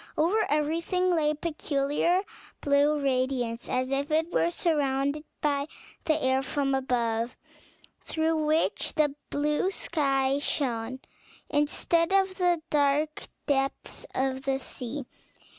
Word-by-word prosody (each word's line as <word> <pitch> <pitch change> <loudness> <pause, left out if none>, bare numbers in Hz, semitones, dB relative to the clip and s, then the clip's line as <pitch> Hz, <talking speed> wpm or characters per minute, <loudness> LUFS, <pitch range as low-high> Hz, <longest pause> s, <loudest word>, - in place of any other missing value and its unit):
Over 385 +8 +2
everything 330 +5 +1
lay 305 -2 +2
a 305 - 0
peculiar 305 +3 0 0.4
blue 290 +1 +3
radiance, 255 -3 -1
as 255 +1 0
if 275 +1 0
it 320 +2 +1
were 335 - +3
surrounded 290 -3 0 0.2
by 285 -1 +1 0.4
the 310 -1 +2
air 260 0 +3
from 275 0 -1
above, 240 -3 0 0.6
through 320 0 0
which 310 +2 +1
the 300 -3 +3 0.2
blue 300 +5 +1
sky 275 -7 0
shone, 255 -3 -2 0.5
instead 330 +4 +2
of 385 -1 +3
the 350 -3 +2
dark 295 +1 +1 0.2
depths 275 -1 -2
of 265 0 0
the 270 0 0
sea. 260 +1 -6
290 Hz, 120 wpm, -28 LUFS, 270-315 Hz, 0.6 s, blue